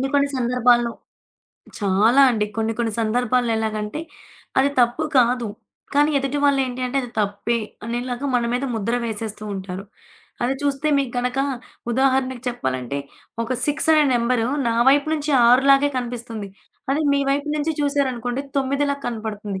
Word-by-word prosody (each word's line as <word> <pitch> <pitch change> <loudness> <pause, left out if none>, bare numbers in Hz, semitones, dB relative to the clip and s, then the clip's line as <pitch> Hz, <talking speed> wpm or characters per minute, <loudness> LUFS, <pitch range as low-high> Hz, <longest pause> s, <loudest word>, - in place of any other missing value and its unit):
కొన్ని 265 - 0
కొన్ని 280 0 +3
సందర్భాల్లో 240 -1 +3 0.9
చాలా 210 +7 +4
అండి. 210 -3 0
కొన్ని 225 0 0
కొన్ని 230 -2 0
సందర్భాల్లో 240 +1 +1
ఎలాగంటే, 215 +4 -3 0.6
అది 275 +2 +4
తప్పు 245 +6 +2
కాదు. 240 -2 +2 0.5
కానీ 295 +2 +4
ఎదుటి 275 +1 -2
వాళ్ళేంటి 265 -3 +1
అంటే 250 +2 -3
అది 245 - -7
తప్పే 205 +3 -1 0.3
అనేలాగా 245 +3 -3
మన 240 - +2
మీద 250 +2 -1
ముద్ర 225 +2 -1
వేసేస్తూ 215 -1 -5
ఉంటారు. 190 0 -6 0.6
అది 250 +2 +1
జూస్తే 285 +1 0
మీకగనక 250 0 -1 0.5
ఉదాహరణకి 260 0 +1
చెప్పాలంటే 130 - -3 0.4
ఒక 240 +3 -3
6 295 +2 -1
అనే 305 -1 +5
నెంబరు 235 -1 +1 0.2
నా 230 - +1
వైపు 285 +2 +4
నుంచి 300 -1 -1 0.2
6 250 +3 +6
లాగే 275 +1 +5
కనిపిస్తుంది. 235 -4 -5 0.4
అది 285 - +1
మీ 280 - +2
వైపు 285 +2 0
నుంచి 300 +2 0
చూసారనుకోండి 265 -3 -1
9లా 280 +1 +1
కనపడుతుంది. 215 -4 -4
245 Hz, 140 wpm, -22 LUFS, 225-275 Hz, 0.9 s, 6